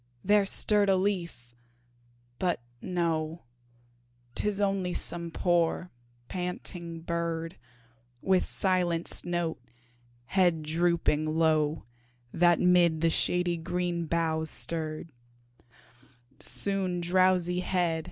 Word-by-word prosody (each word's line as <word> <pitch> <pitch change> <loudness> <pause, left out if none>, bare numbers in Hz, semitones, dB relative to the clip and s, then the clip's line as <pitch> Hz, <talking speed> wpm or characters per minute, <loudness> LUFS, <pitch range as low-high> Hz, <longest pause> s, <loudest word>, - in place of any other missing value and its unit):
there 205 0 +4
stirred 205 0 +3
a 190 - +5
leaf, 175 -11 -3 0.8
but 180 -2 0 0.2
no, 165 -2 -2 0.9
Tis 205 +6 0
only 195 -3 0
some 170 -1 -1
poor, 175 +1 0 0.4
panting 180 -2 -5
bird, 165 0 -3 0.6
With 190 +5 +2
silenced 180 -3 +1
note, 175 -4 -2 0.6
head 175 -1 +2
drooping 160 -1 +1
low, 155 -3 +2 0.5
That 175 0 +4
'mid 175 -3 +4
the 165 0 +3
shady 180 0 +1
green 175 0 -2
boughs 160 -1 0
stirred. 160 0 -2
170 Hz, 85 wpm, -28 LUFS, 165-180 Hz, 0.9 s, a